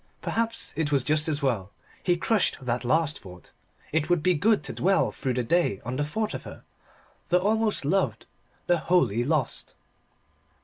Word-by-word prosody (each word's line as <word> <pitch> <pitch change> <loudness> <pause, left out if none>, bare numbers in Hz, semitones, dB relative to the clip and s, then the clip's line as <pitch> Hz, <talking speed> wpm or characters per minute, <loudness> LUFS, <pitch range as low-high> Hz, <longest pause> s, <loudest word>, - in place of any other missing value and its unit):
Perhaps 230 0 -1
it 150 -1 -1
was 140 -3 +2
just 150 +2 +2
as 150 -2 -1
well. 110 -8 0 0.3
He 175 -1 +2
crushed 210 +3 +1
that 125 -1 -2
last 150 +4 +1
thought. 90 -2 -13 0.4
It 155 +1 0
would 175 -3 +2
be 185 - +4
good 205 +7 +2
to - - -5
dwell 195 +2 +2
through 130 -3 -3
the 125 - 0
day 120 - +1
on 125 +2 -3
the 145 - 0
thought 215 +9 -2
of - - -5
her - - -11 0.7
the 180 - +4
almost 215 -2 +1
loved, 190 +6 0 0.4
the 175 -1 +2
wholly 135 - +2
lost. 145 -1 -2
155 Hz, 175 wpm, -26 LUFS, 130-180 Hz, 0.7 s, be